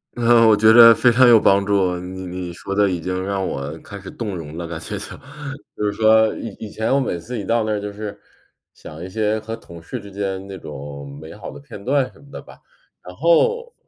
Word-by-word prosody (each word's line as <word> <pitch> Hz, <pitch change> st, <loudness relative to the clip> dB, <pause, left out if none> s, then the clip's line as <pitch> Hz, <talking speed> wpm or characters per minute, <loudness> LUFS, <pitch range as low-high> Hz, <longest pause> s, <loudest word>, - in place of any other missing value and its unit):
嗯， 120 Hz, -1 st, +5 dB
我 105 Hz, -, +6 dB
觉 110 Hz, +1 st, +6 dB
得 115 Hz, -1 st, +9 dB
非 120 Hz, +1 st, +4 dB
常 130 Hz, +2 st, +5 dB
有 115 Hz, -2 st, +8 dB
帮 100 Hz, -1 st, +4 dB
助。 95 Hz, -3 st, +1 dB
你 95 Hz, +1 st, -7 dB
你 90 Hz, -1 st, -6 dB
说 85 Hz, +4 st, -6 dB
的 100 Hz, 0 st, +3 dB
已 90 Hz, -2 st, -2 dB
经 90 Hz, +2 st, -3 dB
让 100 Hz, -1 st, -2 dB
我 70 Hz, +4 st, -5 dB
开 100 Hz, -, -10 dB
始 95 Hz, -, -10 dB
动 105 Hz, -5 st, -5 dB
容 80 Hz, -2 st, -8 dB
了 85 Hz, -1 st, -5 dB
感 80 Hz, -1 st, -6 dB
觉 105 Hz, +5 st, -6 dB
就。 95 Hz, -, -6 dB, 0.7 s
就 105 Hz, -, -2 dB
是 105 Hz, -, +1 dB
说 110 Hz, 0 st, +4 dB
以 110 Hz, -4 st, -7 dB
以 110 Hz, -, -7 dB
前 110 Hz, +4 st, -1 dB
我 140 Hz, -, +3 dB
每 110 Hz, -10 st, -2 dB
次 120 Hz, +8 st, -6 dB
一 100 Hz, -, -4 dB
到 115 Hz, +3 st, +1 dB
那 110 Hz, -, -2 dB
儿 105 Hz, -, 0 dB
就 105 Hz, 0 st, -5 dB
是 105 Hz, -1 st, -7 dB, 0.6 s
想 80 Hz, +3 st, -11 dB
一 -, -, -6 dB
些 110 Hz, +2 st, 0 dB
和 110 Hz, +1 st, -6 dB
同 85 Hz, -5 st, -13 dB
事 -, -, -6 dB
之 100 Hz, -1 st, -12 dB
间 95 Hz, -1 st, -4 dB
那 95 Hz, -, -7 dB
种 70 Hz, -3 st, -9 dB
美 80 Hz, -, -10 dB
好 -, -, -8 dB
的 70 Hz, -, -11 dB
片 70 Hz, +8 st, -11 dB
段 135 Hz, -1 st, +1 dB
什 -, -, -20 dB
么 -, -, -18 dB
的 -, -, -8 dB
吧。 -, -, -15 dB, 0.5 s
然 90 Hz, -, -10 dB
后 465 Hz, -, +2 dB
100 Hz, 265 characters per minute, -21 LUFS, 90-110 Hz, 0.7 s, 得